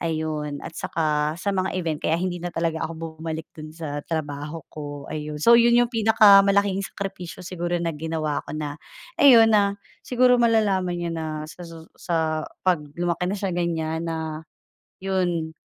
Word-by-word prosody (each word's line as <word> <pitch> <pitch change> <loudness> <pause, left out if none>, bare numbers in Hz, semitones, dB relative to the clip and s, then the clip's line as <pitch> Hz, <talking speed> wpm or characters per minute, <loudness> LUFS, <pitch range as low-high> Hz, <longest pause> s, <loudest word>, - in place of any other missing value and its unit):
ayun 155 -3 -3
at - - -7
saka 150 -2 0
sa 185 +4 -4
mga 190 -1 -1
event 160 -3 -2
kaya 160 - +1
hindi 180 -1 -2
na 175 - -3
talaga 165 -1 -1
ako 165 -1 -8
bumalik 160 0 -4
dun 155 -1 -8
sa 155 -3 -5
trabaho 150 0 -4
ko. 145 -2 -7
Ayun, 150 -1 -5
so 230 - +6
yun 235 0 +5
yung 240 0 +4
pinakamalaking 200 -3 +5
sakripisyo 185 -4 -6
siguro 175 -1 -3
na 170 -1 -1
ginawa 155 -1 -2
ko - - -5
na 150 -1 -4 0.4
ayun, 240 -6 +8
na 200 -1 +3 0.3
siguro 250 0 +4
malalaman 200 -6 +2
niya 175 -1 -3
na 160 -1 -4 0.2
sa 170 +3 -10
susu 165 -1 -12
sa 160 -3 -1 0.2
pag 180 -4 +3 0.2
lumaki 175 0 -1
na 195 - -1
siya 195 -1 -2
ganyan 165 -2 -2
na 160 -1 -4 0.6
yun, 175 -4 -1
165 Hz, 165 wpm, -24 LUFS, 155-190 Hz, 0.6 s, ayun